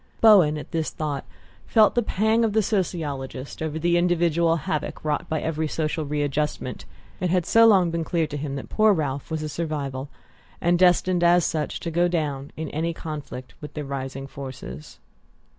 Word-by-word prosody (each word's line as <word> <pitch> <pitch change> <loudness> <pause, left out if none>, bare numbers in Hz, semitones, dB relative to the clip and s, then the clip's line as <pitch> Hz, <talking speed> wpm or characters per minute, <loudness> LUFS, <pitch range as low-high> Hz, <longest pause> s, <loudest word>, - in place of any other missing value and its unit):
Bowen, 185 -9 +6
at 150 - -8
the 165 -2 0
thought, 150 -3 -4 0.4
felt 215 -2 +5
the 240 - +2
pang 220 +2 +1
of 220 -2 +1
the 220 0 +3
sociologist 150 -10 -3
over 160 -1 -2
the 170 +2 +2
individual 170 -1 +2
havoc 155 -1 -3
wrought 150 -1 -1
by 160 - 0
every 160 0 -2
social 155 0 -2
readjustment: 145 -3 -2 0.3
it 180 - 0
had 180 -1 +1
so 230 0 +6
long 185 -6 +5
been 165 0 -1
clear 165 0 0
to 150 -1 -7
him 145 -1 -4
that 135 - -6
poor 215 -1 +4
Ralph 145 -5 -2
was 160 -1 -3
a - - -2
survival, 145 -4 -4 0.5
and 175 0 +2
destined, 180 0 +4
as 175 0 +5
such, 155 -2 -2
to 170 - -3
go 175 +2 +3
down 145 -5 -2
in 160 0 -3
any 165 +2 -2
conflict 145 -6 -7
with 150 -1 -9
the 150 -2 -4
rising 135 0 -5
forces. 130 - -9
160 Hz, 180 wpm, -24 LUFS, 145-175 Hz, 0.5 s, Bowen